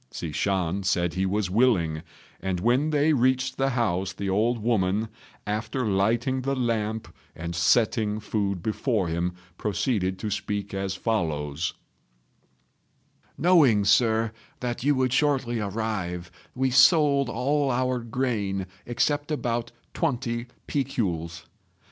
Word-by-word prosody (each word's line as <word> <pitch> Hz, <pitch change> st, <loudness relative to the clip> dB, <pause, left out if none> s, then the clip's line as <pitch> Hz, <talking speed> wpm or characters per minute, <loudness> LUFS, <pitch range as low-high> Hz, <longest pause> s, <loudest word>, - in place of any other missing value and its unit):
Hsi 80 Hz, -, -5 dB
Shan 95 Hz, +2 st, 0 dB
said 90 Hz, -2 st, +1 dB
he 95 Hz, +1 st, 0 dB
was 100 Hz, -1 st, -1 dB
willing; 95 Hz, -9 st, +2 dB, 0.4 s
and 95 Hz, -2 st, -2 dB
when 125 Hz, -, +2 dB
they 150 Hz, +1 st, +3 dB
reached 130 Hz, 0 st, +1 dB
the 135 Hz, 0 st, +2 dB
house 95 Hz, -7 st, 0 dB
the 100 Hz, 0 st, -3 dB
old 115 Hz, +5 st, +2 dB
woman, 110 Hz, -1 st, 0 dB, 0.4 s
after 110 Hz, +5 st, -2 dB
lighting 115 Hz, +6 st, +1 dB
the 135 Hz, +1 st, -1 dB
lamp 110 Hz, -3 st, -2 dB, 0.2 s
and 85 Hz, +1 st, -5 dB
setting 105 Hz, +3 st, +2 dB
food 100 Hz, -4 st, -2 dB
before 110 Hz, -4 st, 0 dB
him, 85 Hz, +2 st, -1 dB, 0.3 s
proceeded 100 Hz, -3 st, 0 dB
to 105 Hz, +1 st, -4 dB
speak 100 Hz, 0 st, -3 dB
as 95 Hz, -1 st, -2 dB
follows: 80 Hz, -8 st, -1 dB, 1.6 s
"Knowing, 145 Hz, -, +5 dB
Sir, 110 Hz, +1 st, +3 dB, 0.3 s
that 120 Hz, -1 st, -3 dB
you 145 Hz, +1 st, +3 dB
would 130 Hz, -1 st, +1 dB
shortly 130 Hz, -5 st, +1 dB
arrive, 100 Hz, -5 st, -3 dB, 0.2 s
we 130 Hz, 0 st, +1 dB
sold 140 Hz, +1 st, +5 dB
all 145 Hz, +1 st, +1 dB
our 125 Hz, 0 st, 0 dB
grain 110 Hz, -5 st, -2 dB, 0.2 s
except 145 Hz, +5 st, 0 dB
about 120 Hz, -6 st, -2 dB, 0.2 s
twenty 120 Hz, -2 st, -1 dB, 0.2 s
piculs. 90 Hz, -, -2 dB
110 Hz, 125 wpm, -26 LUFS, 95-130 Hz, 1.6 s, Knowing